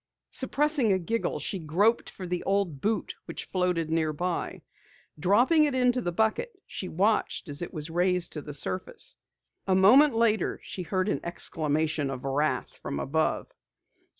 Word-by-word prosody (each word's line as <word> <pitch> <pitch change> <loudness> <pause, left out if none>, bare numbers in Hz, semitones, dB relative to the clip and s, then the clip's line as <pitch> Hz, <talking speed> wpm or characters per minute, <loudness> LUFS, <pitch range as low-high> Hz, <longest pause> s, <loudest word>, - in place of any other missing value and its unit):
Suppressing 280 -3 +2
a 190 - +4
giggle, 225 +6 -1
she 195 - -3
groped 185 +9 +2
for 185 - -8
the 180 0 -2
old 195 -8 0
boot 215 0 -1
which - - -6
floated 180 -3 0
nearby. 165 +2 -1 0.6
Dropping 245 - +4
it 285 -3 -1
into 250 0 +3
the 175 - -2
bucket, 220 - 0
she 185 - -6
watched 200 +1 +1
as 145 +2 -3
it 175 - -4
was 155 -1 -5
raised 180 0 +1
to 150 - -4
the 145 0 -7
surface. 185 - -3 0.5
A 190 - +3
moment 250 +9 +6
later 220 -3 +2
she 185 - -6
heard 185 +2 -1
an - - 0
exclamation 155 -3 -1
of 130 -2 -5
wrath 140 +3 -1
from 70 - -4
above. 160 +3 -1
185 Hz, 155 wpm, -28 LUFS, 160-225 Hz, 0.6 s, moment